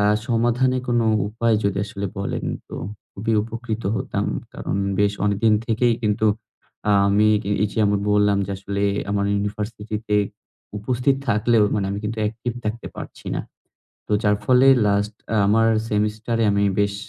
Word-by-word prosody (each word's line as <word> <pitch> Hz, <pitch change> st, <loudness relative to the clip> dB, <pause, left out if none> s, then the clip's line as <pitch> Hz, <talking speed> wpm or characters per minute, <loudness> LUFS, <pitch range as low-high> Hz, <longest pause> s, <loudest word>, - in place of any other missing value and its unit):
আ -, -, +3 dB, 0.3 s
সমাধানের 125 Hz, +2 st, +2 dB
কোন 120 Hz, -1 st, +2 dB, 0.3 s
উপায় 115 Hz, +1 st, +1 dB
যদি 100 Hz, -1 st, +1 dB
আসলে 100 Hz, 0 st, -4 dB
বলেন 100 Hz, -, -3 dB, 0.2 s
তো -, -, -8 dB, 0.4 s
খুবই 110 Hz, +3 st, -2 dB
উপকৃত 115 Hz, 0 st, -5 dB
হতাম। -, -, -2 dB, 0.3 s
কারণ -, -, -3 dB, 0.2 s
বেশ 105 Hz, 0 st, +3 dB
অনেকদিন 105 Hz, +2 st, +3 dB
থেকেই 115 Hz, +1 st, +2 dB
কিন্তু 105 Hz, 0 st, +1 dB, 0.6 s
আ -, -, +5 dB, 0.2 s
আমি 105 Hz, +2 st, +4 dB, 0.3 s
এই 105 Hz, -, +2 dB
যে -, -, -4 dB
আমি 100 Hz, 0 st, +2 dB
বললাম 105 Hz, -1 st, +3 dB
যে -, -, -6 dB
আসলে 100 Hz, 0 st, -3 dB, 0.3 s
আমার 100 Hz, 0 st, +1 dB
ইউনিভার্সিটি 105 Hz, +1 st, -3 dB
তে 105 Hz, -, +3 dB, 0.6 s
উপস্থিত 125 Hz, +5 st, +1 dB
থাকলেও 110 Hz, 0 st, +3 dB
মানে 100 Hz, -2 st, 0 dB
আমি 100 Hz, -, -3 dB
কিন্তু 110 Hz, +1 st, -3 dB
অ্যাকটিভ 115 Hz, +3 st, -2 dB
থাকতে 110 Hz, +2 st, -3 dB
পারছি -, -, -9 dB
না। -, -, -1 dB, 0.7 s
তো -, -, -2 dB
যার 105 Hz, -1 st, +3 dB
ফলে 130 Hz, +3 st, +5 dB, 0.2 s
লাস্ট 100 Hz, +1 st, +1 dB, 0.3 s
আমার 115 Hz, +2 st, +4 dB, 0.2 s
সেমিস্টারে 110 Hz, +2 st, 0 dB
আমি 100 Hz, 0 st, +2 dB
বেশ 100 Hz, 0 st, +1 dB
105 Hz, 155 wpm, -22 LUFS, 100-115 Hz, 0.7 s, আ